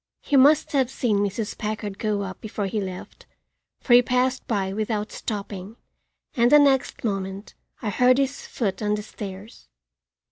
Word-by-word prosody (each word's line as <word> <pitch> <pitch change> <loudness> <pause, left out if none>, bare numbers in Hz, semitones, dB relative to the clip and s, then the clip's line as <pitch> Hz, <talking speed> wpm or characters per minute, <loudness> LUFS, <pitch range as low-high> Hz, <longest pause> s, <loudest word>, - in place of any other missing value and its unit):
He 285 - 0
must 285 +3 +5
have 265 -4 +2
seen 230 -6 0
Mrs. 205 +2 -2
Packard 210 -2 -4
go 210 -2 -1
up 190 -1 -7
before 210 -1 -4
he 205 +2 -2
left, 185 -2 -8 0.5
for 245 - +2
he 245 - +9
passed 250 +1 0
by 195 -4 -1
without 215 0 -2
stopping, 200 -1 -6 0.6
and 240 0 +3
the 295 - +9
next 275 -3 +2
moment 195 -2 -3 0.3
I 210 - -1
heard 250 +4 +4
his 275 0 -1
foot 195 -5 -2
on 210 0 +1
the 210 - -5
stairs. 200 - -9
215 Hz, 165 wpm, -24 LUFS, 200-250 Hz, 0.6 s, he